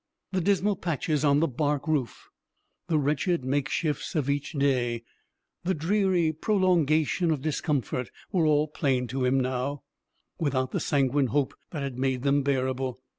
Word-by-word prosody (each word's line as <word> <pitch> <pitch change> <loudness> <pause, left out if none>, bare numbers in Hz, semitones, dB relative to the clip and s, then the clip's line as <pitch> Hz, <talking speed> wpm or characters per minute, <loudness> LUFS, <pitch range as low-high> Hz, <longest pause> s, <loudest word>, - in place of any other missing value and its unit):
The 185 -1 0
dismal 200 +2 +2
patches 155 -3 -1
on 145 0 +4
the 165 - +3
bark 145 +3 -1
roof, 140 -8 -1 0.6
the 165 -3 +2
wretched 150 +3 +1
makeshifts 145 +3 -1
of 140 -3 +1
each 145 +3 -3
day, 125 -5 +1 0.6
the 185 +2 0
dreary 175 -1 +2
prolongation 170 -3 +2
of 150 -4 0
discomfort, 140 - -1 0.2
were 175 -5 +2
all 150 0 +3
plain 135 -4 0
to 130 +1 -1
him 130 +2 +3
now, 130 +2 -2 0.6
without 130 -4 0
the - - -1
sanguine 140 -1 +2
hope 135 +3 0 0.2
that 150 -5 -4
had 130 -2 -4
made 130 -1 0
them 140 0 +3
bearable. 130 -2 -1
145 Hz, 150 wpm, -27 LUFS, 130-160 Hz, 0.6 s, on